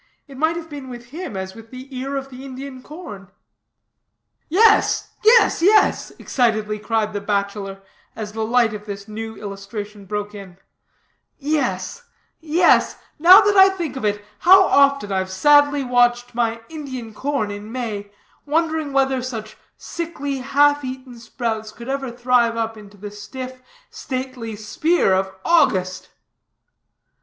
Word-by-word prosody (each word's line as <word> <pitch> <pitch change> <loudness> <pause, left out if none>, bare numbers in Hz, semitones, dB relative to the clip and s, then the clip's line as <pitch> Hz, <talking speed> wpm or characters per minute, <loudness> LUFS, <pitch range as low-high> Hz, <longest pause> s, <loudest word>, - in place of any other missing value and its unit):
It 275 - -12
might 315 +4 +1
have 335 -1 -6
been 285 -4 -9
with 240 -1 -10
him 320 - -6
as 190 0 -5
with 225 +1 -13
the 260 +2 -10
ear 270 +2 -4
of 270 0 -4
the 255 +1 -10
Indian 265 0 -8
corn." 235 - -10 1.2
"Yes, 415 +6 +3
yes, 455 -3 +5
yes," 415 +5 +4
excitedly 215 -4 0
cried 215 0 -1
the 205 - -3
bachelor, 200 -1 -3 0.3
as 215 -2 -6
the 220 0 -3
light 230 0 +2
of 210 0 -8
this 200 0 -7
new 220 +1 -6
illustration 205 0 -8
broke 205 +1 -4
in, 195 -3 -11 0.8
"yes, 280 - -2 0.4
yes; 330 +2 +3
and - - -24 0.3
now 375 +4 +10
that 410 0 +2
I 385 0 +8
think 345 -7 -4
of 265 - -6
it, 205 0 -1
how 380 +2 +7
often 280 - +3
I've 190 -1 -1
sadly 290 +7 +4
watched 245 -1 +2
my 230 -1 -1
Indian 260 -8 -7
corn 270 -4 -2
in 205 +2 -8
May, 220 -5 -4 0.4
wondering 315 -1 0
whether 270 -1 +2
such 225 -4 -6 0.2
sickly, 285 -5 -5
half 290 +2 +3
eaten 255 -2 -7
sprouts, 225 -2 -4
could 235 +3 -10
ever 270 -1 -2
thrive 240 -1 +1
up 225 0 -2
into 205 -1 -14
the 205 +1 -8
stiff, 255 +5 -8 0.3
stately 255 -4 -5
spear 220 - +1
of 190 0 0
August." 185 - +2
245 Hz, 150 wpm, -21 LUFS, 210-285 Hz, 1.2 s, now